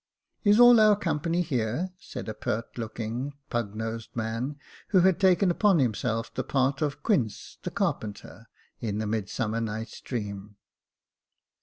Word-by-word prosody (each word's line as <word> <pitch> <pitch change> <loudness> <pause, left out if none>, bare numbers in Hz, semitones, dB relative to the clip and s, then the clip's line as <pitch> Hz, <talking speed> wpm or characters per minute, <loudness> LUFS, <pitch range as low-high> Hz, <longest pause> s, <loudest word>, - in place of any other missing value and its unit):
*' - - -49
Is 205 +1 +5
all 245 -1 +9
our 215 -1 +6
company 165 -2 0
here? 130 +4 -1
" - - -42
said - - -8
a 110 - -3
pert 110 +2 -3
looking, 115 +1 -4
little 140 0 -9
pug 115 -4 -2
nosed 115 +1 -5
man, 115 +5 -2 0.3
who 185 - +4
had 185 -1 +4
taken 185 -1 +4
upon 200 +1 +4
himself 115 -3 0
the 130 - -2
part 135 +2 +1
of 145 -2 -2
Quince 125 - -1
the - - -3
carpenter, 110 +2 -3 0.3
in 105 -3 -2
the 110 - -1
Midsummer 110 +1 -2
Night's 110 0 -5
Dream. 105 -4 -5
120 Hz, 160 wpm, -27 LUFS, 110-170 Hz, 0.3 s, all